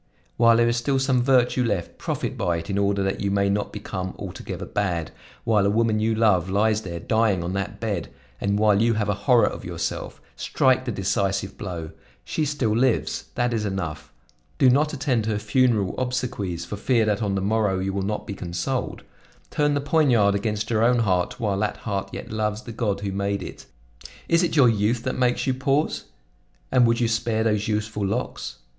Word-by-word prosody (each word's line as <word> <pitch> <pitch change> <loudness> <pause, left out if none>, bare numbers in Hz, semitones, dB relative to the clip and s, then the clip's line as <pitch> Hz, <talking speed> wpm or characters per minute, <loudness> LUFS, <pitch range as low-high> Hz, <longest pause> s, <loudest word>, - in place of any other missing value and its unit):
While 115 -1 +5
there 120 0 +4
is 120 +1 +1
still 135 +3 0
some 130 -2 +2
virtue 125 -1 +3
left, 100 -7 -2
profit - - -3
by 85 -1 0
it 85 +3 -5
in 100 - 0
order 100 0 +1
that 95 0 -1
you 100 - 0
may 100 0 +2
not 100 +1 -1
become 95 -3 -5
altogether - - -6
bad; 90 -5 -2 0.3
while 105 -3 +3
a 100 - +3
woman 110 0 +2
you 110 +1 +1
love 100 -5 +3
lies 105 +2 +2
there 85 -4 -6
dying 110 -3 +1
on 90 +2 -3
that 100 +2 -3
bed, 100 -7 -3 0.3
and 100 0 0
while 105 -1 +4
you 115 0 +3
have 105 -1 -1
a - - +3
horror 115 +5 +3
of - - -4
yourself, - - -4 0.2
strike 130 -1 +2
the 120 - -2
decisive 100 0 -1
blow; 85 -5 -6 0.3
she 155 - -1
still 135 -7 0
lives; 125 0 +1
that 120 0 +1
is 110 -2 -1
enough; 90 -7 -4 0.5
do 130 -2 +5
not 150 +4 +2
attend 130 -6 0
her 110 -2 0
funeral 105 -2 +2
obsequies 125 -8 -2
for 105 - -6
fear 115 +1 +2
that 105 0 0
on 100 -2 0
the - - 0
morrow 105 0 +1
you 95 +1 -2
will 100 - -1
not 105 +2 -3
be 100 - -5
consoled; 95 +9 -3 0.5
turn 145 -1 +1
the 145 - 0
poignard 130 -9 +3
against 105 +2 -2
your 110 -1 +2
own 125 +1 +4
heart 95 -4 0
while 100 -4 0
that 105 0 -1
heart 100 -3 -3
yet - - -7
loves 110 +1 -2
the 115 - -8
God 105 -3 -2
who 100 -1 -3
made 100 0 -2
it. - - -10 0.6
Is 165 +1 +4
it 175 - 0
your 140 -5 +6
youth 115 +1 +1
that 130 - -1
makes 125 -1 +1
you 130 - +1
pause? 135 +3 0 0.7
And 125 -2 +5
would 115 0 +2
you 120 - +2
spare 115 -1 0
those 105 -2 +1
youthful 105 -1 -2
locks? 115 +6 -3
110 Hz, 200 wpm, -24 LUFS, 100-120 Hz, 0.7 s, your